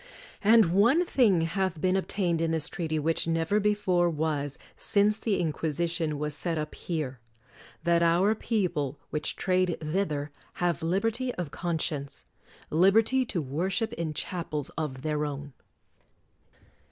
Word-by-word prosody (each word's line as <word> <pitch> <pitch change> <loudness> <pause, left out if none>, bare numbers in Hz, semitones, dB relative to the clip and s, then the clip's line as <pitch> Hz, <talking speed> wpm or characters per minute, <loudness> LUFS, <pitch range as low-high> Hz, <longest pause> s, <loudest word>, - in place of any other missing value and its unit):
And 215 -4 +6
one 240 - +4
thing 220 - +3
hath 170 0 -1
been 185 +3 +2
ob 190 - -1
tained 175 -5 0
in 165 - +1
this 160 -2 0
treaty 160 -3 -2
which 160 +2 0
never 165 +5 +1
before 200 -4 +2
was 150 -3 -2 0.2
since 210 +1 +2
the 215 -4 0
Inquisition 160 0 -1
was 150 0 -3
set 165 +2 -2
up 150 0 -4
here, 150 -7 -4 0.3
— 120 +3 -23
that 170 0 +3
our 175 +5 +4
people 180 - -1
which 150 - -2
trade 185 -2 +1
thither 155 -3 -2 0.2
have 175 -1 -1
liberty 225 +9 0
of 175 -6 -4
con 170 -2 -2
science,— 140 -3 -4 0.5
liberty 220 +10 +4
to 170 -8 -1
worship 180 - -1
in 160 -2 -3
chapels 155 -4 -3
of 150 -6 -5
their 150 -1 0
own. 145 -1 -5
170 Hz, 145 wpm, -28 LUFS, 155-195 Hz, 0.5 s, And